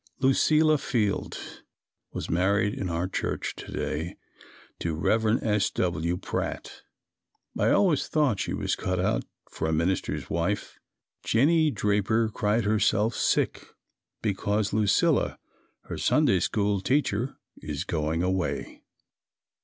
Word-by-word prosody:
Lucilla 155 +3 +4
Field 110 -8 -1 0.7
was - - -5
married 100 +5 +2
in 95 - -3
our 85 +2 -1
church 95 - -3
to - - -9
day 80 +3 -3 0.6
to 85 -2 -2
Rev. 110 +7 +2
S. 105 -3 +2
W. 85 0 -1
Pratt. 90 - -4 0.7
I - - +2
always 175 -8 +3
thought 145 -10 +1
she - - -2
was - - -1
cut 90 0 -2
out 105 +5 0 0.3
for 80 - -3
a - - 0
minister's 85 +4 -1
wife. 85 +5 -2 0.4
Jennie 155 +7 +3
Draper 105 -1 +1
cried 105 +2 0
herself 105 +1 +2
sick - - 0 0.6
because 105 0 0
Lucilla, 105 -2 +2 0.5
her - - -6
Sunday - - +3
School 100 -2 0
teacher, 130 0 0 0.2
is 75 +1 -4
going 80 0 -1
away. 95 0 -2
105 Hz, 120 wpm, -27 LUFS, 90-115 Hz, 0.7 s, Lucilla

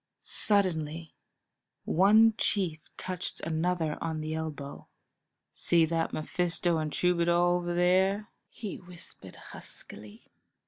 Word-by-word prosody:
Suddenly 165 -6 0 0.7
one 215 +5 +5
chief 185 -7 +1 0.2
touched 185 -1 -4
another 160 -1 -1
on 160 -1 -2
the 155 0 -3
elbow. 155 -3 -6 0.6
"See 170 -1 +3
that 165 0 -1
Mephisto 175 +1 0
and 155 -1 -2
troubadour 170 0 +2 0.2
over 175 0 -3
there?" 190 +4 +2 0.2
he 210 -5 -6
whispered 180 -1 -11
huskily. 105 +2 -11
170 Hz, 100 wpm, -29 LUFS, 160-185 Hz, 0.7 s, one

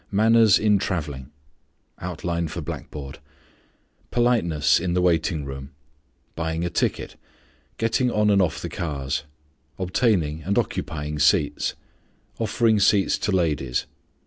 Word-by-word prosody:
MANNERS 110 +1 +5
IN 105 -2 +3
TRAVELLING. 75 -9 -3 2.8
Politeness 85 -12 +2
in 85 0 -2
the 90 - +2
waiting 80 -3 +1
room. 70 0 -8 0.6
Buying 80 +1 -2
a 85 - -2
ticket. - - -2 0.6
Getting 115 +3 +1
on 105 -2 +2
and 100 -1 +4
off 90 - -1
the - - -2
cars. 75 -3 -3 0.5
Obtaining 90 -5 +1
and 100 +6 -1
occupying 75 0 -2
seats. 75 0 +2 0.6
_Offering 110 -1 +2
seats 100 0 +3
to 105 - -1
ladies. 75 -9 0
85 Hz, 105 wpm, -24 LUFS, 75-105 Hz, 2.8 s, MANNERS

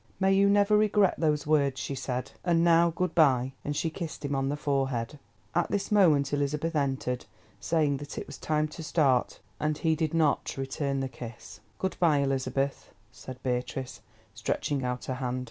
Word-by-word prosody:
"May 190 0 +3
you 200 +1 +4
never 205 +1 +4
regret 210 -2 +4
those 150 -2 +1
words," 140 -3 +2
she - - -3
said; 130 -1 -4
"and 170 -2 +3
now 170 0 +5
good 175 +1 -2
bye," 135 -5 +3
and 145 - -3
she 160 +2 -1
kissed 160 -3 -6
him 140 - -2
on 135 0 0
the 145 - -2
forehead. 135 -2 -1 0.3
At - - +1
this 200 0 -2
moment 155 -9 +4
Elizabeth 150 +3 -1
entered, 135 -3 -1 0.3
saying 150 -4 +1
that 145 +1 -8
it - - -4
was - - -10
time 155 0 0
to 155 - -9
start, 140 -5 +1 0.2
and 150 0 0
he 160 -1 +1
did 160 0 -1
not 155 -4 +1
return 135 +1 -2
the 135 - -1
kiss. 120 -2 -10 0.2
"Good 190 -2 -2
bye, 160 -4 +4
Elizabeth," 135 0 -1 0.2
said 130 0 -10
Beatrice, 125 +1 -3 0.3
stretching 140 -3 -2
out 125 0 -3
her 130 - -2
hand. 125 -1 -2
145 Hz, 180 wpm, -28 LUFS, 135-165 Hz, 0.3 s, now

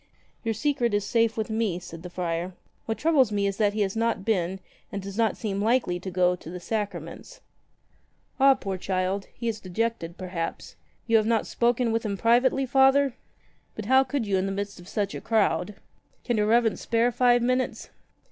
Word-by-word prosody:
"Your 225 -2 -1
secret 245 -3 0
is 205 -1 0
safe 230 0 +1
with 220 0 -2
me," 220 -5 0
said 170 -2 -9
the 180 - -8
friar. 175 0 -3 0.3
"What 225 - -1
troubles 290 -8 +3
me 200 -1 0
is 195 -1 -1
that 205 -2 +2
he 215 - -1
has 195 0 0
not 225 -3 0
been, 190 -4 0 0.3
and 200 - -3
does 195 0 -7
not 225 -2 +1
seem 200 -3 -3
likely 220 -5 +1
to 190 - -6
go, 180 0 +2
to 165 - -11
the 180 +1 -6
sacraments." 210 - -5 1.0
"Ah, 270 0 +7
poor 195 -5 -4
child! 190 +1 -1
He 235 - -4
is 220 -2 -2
dejected, 185 -3 -3
perhaps. 180 -3 -5 0.3
You 230 -1 +4
have 215 0 +1
not 225 -2 +2
spoken 240 0 +1
with 225 0 0
him 200 -3 -2
privately, 245 +5 +3
Father? 270 +1 +4 0.6
But 215 - -6
how 260 +4 +5
could 270 -1 -2
40 210 - -6
you 190 - +3
in 190 +1 0
the - - -2
midst 200 0 -4
of 175 - -13
such 200 -1 -2
a - - -6
crowd! 215 -2 +1 0.5
Can 240 - 0
your 210 0 +2
Reverence 230 0 +2
spare 235 +1 +2
five 245 0 +3
minutes? 255 +1 -1
220 Hz, 200 wpm, -26 LUFS, 195-235 Hz, 1.0 s, Ah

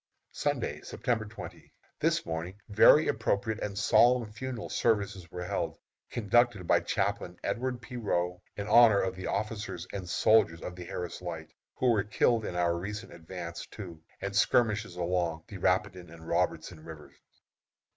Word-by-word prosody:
Sunday, - - -2
September 115 -3 -2
20. 110 +1 -10 0.3
This - - +1
morning 85 +4 -4
very 110 +9 +7
appropriate 110 -1 0
and 100 -1 -4
solemn 120 +2 +4
funeral 125 0 -5
services 100 -6 0
were 90 +1 -6
held, 90 - -2 0.3
conducted 120 -2 +2
by - - +4
Chaplain - - -2
Edward 125 0 -2
P. 125 +1 -7
Roe, 90 -5 -1 0.2
in 100 0 -4
honor 110 -1 +7
of 95 0 -1
the 95 - -5
officers 105 -4 -3
and 95 -3 -5
soldiers 95 -7 +3
of 90 - -6
the 90 -1 -8
Harris 90 0 -5
Light, 85 -3 -6 0.2
who 125 -1 +3
were 105 -4 +2
killed 110 +2 +2
in - - -4
our 85 -1 +2
recent 100 +3 -6
advance 85 0 -7
to, 85 -7 -9 0.2
and 100 0 -4
skirmishes 110 -2 +2
along, 85 -2 -1
the 100 - -8
Rapidan 90 -1 0
and 80 0 -12
Robertson 80 - -1
Rivers. 80 -2 -11
100 Hz, 155 wpm, -30 LUFS, 90-110 Hz, 0.3 s, very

